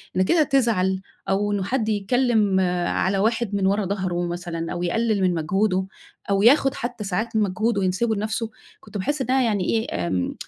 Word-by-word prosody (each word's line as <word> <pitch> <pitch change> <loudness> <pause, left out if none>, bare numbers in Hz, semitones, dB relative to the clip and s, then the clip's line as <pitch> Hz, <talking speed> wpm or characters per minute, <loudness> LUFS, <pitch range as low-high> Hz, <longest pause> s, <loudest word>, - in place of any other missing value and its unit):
إن 185 - +2
كده 315 - +3
تزعل 215 -9 +1 0.3
أو 205 +2 +1
إنّه 200 -2 -1
حد 220 +2 -1
يتكلّم 215 -2 +2 0.3
على 195 +1 0
واحد 220 0 0
من 195 -1 +1
ورا 200 0 +1
ضهره 180 -3 -2
مثلًا، 170 -1 -4
أو 175 - -3
يقلل 215 +2 0
من 185 -1 +2
مجهوده، 190 +4 0 0.4
أو 195 0 +2
ياخد 270 +2 +5
حتّى 240 -2 -5
ساعات 220 +4 -2
من 220 - +3
مجهوده 210 +3 0
وينسبه 195 +5 0
لنفسه، 220 +2 -2 0.3
كنت 210 -1 -9
باحس 285 +8 -1
إنّها 260 +1 +2
يعني 210 -5 +1
إيه 155 - -1
امم 90 -1 -1
205 Hz, 180 wpm, -23 LUFS, 185-230 Hz, 0.4 s, ياخد